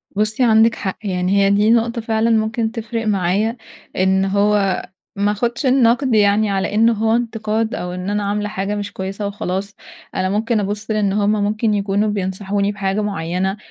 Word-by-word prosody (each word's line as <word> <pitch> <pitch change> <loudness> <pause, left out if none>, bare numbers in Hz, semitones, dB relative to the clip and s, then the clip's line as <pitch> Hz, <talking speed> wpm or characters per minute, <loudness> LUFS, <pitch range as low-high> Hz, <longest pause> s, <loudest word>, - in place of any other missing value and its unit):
بُصّي، 215 +4 +1
عندِك 225 0 +4
حق 190 - -4
يعني 185 0 0
هي - - +3
دي 205 +2 +3
نقطة 235 0 +1
فعلًا 225 0 0
ممكن 225 0 +1
تفرق 230 -1 -4
معايا، 205 +4 0 0.4
إن 190 +1 +2
هو 200 0 +1 0.3
ما 205 +1 +1
اخدش 235 +5 -2
النقد 255 0 +3
يعني 205 0 +3
على 195 +1 -1
إن 225 +2 +5
هو 225 0 +1
انتقاد، 225 -1 -1
أو 180 - -4
إن 180 +2 -4
أنا 205 0 -1
عاملة 210 +1 -2
حاجة 200 0 -3
مش 205 0 -5
كويسة 195 +2 -4
وخلاص، 200 0 -4 0.4
أنا 185 - 0
ممكن 220 +3 0
أبُصّ 210 +2 -3
لأن 210 -2 +1
هم 205 0 +2
ممكن 215 +1 0
يكونوا 200 +1 0
بينصحوني 200 +1 -1
بحاجة 195 0 -2
معيّنة، 190 -1 -2
210 Hz, 170 wpm, -19 LUFS, 195-220 Hz, 0.4 s, إن